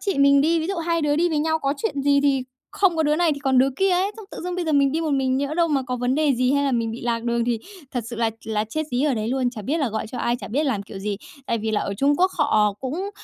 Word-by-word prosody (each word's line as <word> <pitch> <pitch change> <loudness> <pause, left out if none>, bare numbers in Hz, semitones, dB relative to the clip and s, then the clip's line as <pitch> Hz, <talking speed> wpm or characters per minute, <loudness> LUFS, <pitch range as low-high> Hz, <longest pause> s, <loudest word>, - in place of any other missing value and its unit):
chị 395 -8 -1
mình 280 0 +6
đi, 325 +3 +2
ví 320 - -2
dụ 390 +1 -2
hai 335 0 0
đứa 290 -1 +2
đi 345 +2 +2
với 310 - 0
nhau, 320 +1 +1
có 275 -2 -1
chuyện 285 -7 -2
gì 280 0 +4
thì 275 -2 +2 0.3
không 385 -4 +2
có 320 - +2
đứa 300 0 +2
này 340 -2 +3
thì 285 - -5
còn 265 -2 +2
đứa 265 +2 +5
kia 390 0 +2
ấy, 370 +3 +2
xong 440 - -9
tự - - -8
dưng 360 0 -3
bây 360 -1 -2
giờ 315 - -1
mình 280 -2 +3
đi 320 - 0
một 320 -2 -1
mình, 265 -2 +1
nhỡ 280 +2 -2
đâu 335 0 +2
mà 280 -3 +1
có 250 0 -3
vấn 250 +1 0
đề 295 -2 +2
gì 255 +2 +1
hay 285 0 +2
là 275 - +1
mình 230 -2 0
bị 230 - -7
lạc 235 -1 -1
đường 235 0 0
thì 240 -1 0 0.3
thật 245 - -2
sự 235 - -6
là 225 -1 +1
là 215 -1 -1
chết 310 +6 -2
dí 245 +2 0
ở 290 -3 +2
đấy 220 0 -2
luôn, 255 -1 0
chả 220 -4 -8
biết 295 +10 -1
là 280 - +1
gọi 220 0 -3
cho 245 - -7
ai, 240 0 0
chả - - -8
biết 280 +8 0
làm 225 -9 -1
kiểu 200 -1 -9
gì. 200 +1 -3 0.3
Tại 230 - 0
vì 220 0 -2
là 215 - +1
ở 200 - -3
Trung 280 +8 +2
Quốc 370 +3 +3
họ 215 -8 +3
cũng 330 +10 -3
275 Hz, 335 wpm, -23 LUFS, 240-315 Hz, 0.3 s, mình